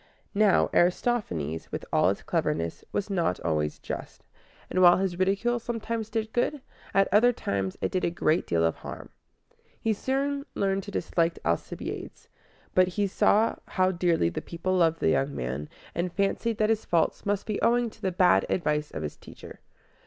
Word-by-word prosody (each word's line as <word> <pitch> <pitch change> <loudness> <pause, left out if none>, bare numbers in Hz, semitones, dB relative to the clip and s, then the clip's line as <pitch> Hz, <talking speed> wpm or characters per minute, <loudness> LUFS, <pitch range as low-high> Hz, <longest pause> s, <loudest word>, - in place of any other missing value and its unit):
Now, 210 -1 +3
Aristophanes, 175 - 0
with - - -4
all - - +4
his - - -3
cleverness, 85 +2 -1
was 205 0 -2
not 170 - 0
always 75 -2 -1
just; - - -7 0.4
and 185 - 0
while 175 -1 +8
his 185 -2 -2
ridicule 200 +6 +1
sometimes 230 -1 -4
did 220 0 -3
good, 270 +4 0 0.3
at 195 0 +3
other 230 +4 +6
times 100 - -3
it - - -1
did 185 - -1
a - - +2
great 170 -1 +1
deal 85 -1 +1
of 80 - 0
harm. - - -8 0.7
He 225 - +1
soon 275 +5 -1
learned 195 -1 +1
to - - -7
dislike 170 -3 0
Alcibiades; 85 0 -4 0.4
but 185 0 +5
he 200 +3 0
saw 210 +3 +3
how 185 0 +2
dearly 170 - +2
the 85 - -4
people 180 +2 -2
loved 165 -2 +2
the - - +3
young 135 - +1
man, 65 +4 -4 0.2
and 175 +1 -2
fancied 200 +4 0
that 215 -1 +2
his 220 -1 0
faults 170 -2 +1
must 205 -1 -1
be 215 - -2
owing 240 -1 +2
to - - -20
the 190 - 0
bad 180 0 +4
advice 150 -4 0
of 80 - -6
his 75 - -5
teacher. - - -12
185 Hz, 175 wpm, -27 LUFS, 155-215 Hz, 0.7 s, while